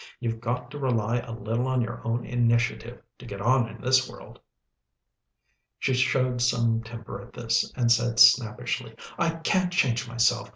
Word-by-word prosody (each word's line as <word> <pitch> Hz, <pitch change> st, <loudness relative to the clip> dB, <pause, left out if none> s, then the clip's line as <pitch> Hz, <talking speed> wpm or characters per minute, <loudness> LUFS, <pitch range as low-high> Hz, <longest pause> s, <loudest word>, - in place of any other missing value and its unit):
You've 115 Hz, -2 st, -3 dB
got 125 Hz, +1 st, -3 dB
to 145 Hz, -, -7 dB
rely 120 Hz, -3 st, 0 dB
a 120 Hz, -, -8 dB
little 115 Hz, +3 st, -2 dB
on 130 Hz, -1 st, 0 dB
your 120 Hz, +1 st, -6 dB
own 115 Hz, +1 st, -2 dB
initiative, 120 Hz, 0 st, 0 dB, 0.2 s
to -, -, -12 dB
get 100 Hz, -3 st, -7 dB
on 120 Hz, +2 st, +2 dB
in -, -, -11 dB
this 130 Hz, 0 st, +2 dB
world." -, -, -13 dB, 1.4 s
She 130 Hz, -, 0 dB
showed 125 Hz, -1 st, +1 dB
some 115 Hz, -2 st, +1 dB
temper 115 Hz, 0 st, -9 dB
at -, -, -15 dB
this, -, -, -1 dB
and 120 Hz, -1 st, +1 dB
said 115 Hz, -1 st, +2 dB
snappishly, 120 Hz, 0 st, +3 dB, 0.2 s
"I 170 Hz, -, +2 dB
can't 180 Hz, +2 st, 0 dB
change 125 Hz, -9 st, +1 dB
myself. 120 Hz, +1 st, +1 dB
120 Hz, 165 wpm, -26 LUFS, 115-125 Hz, 1.4 s, snappishly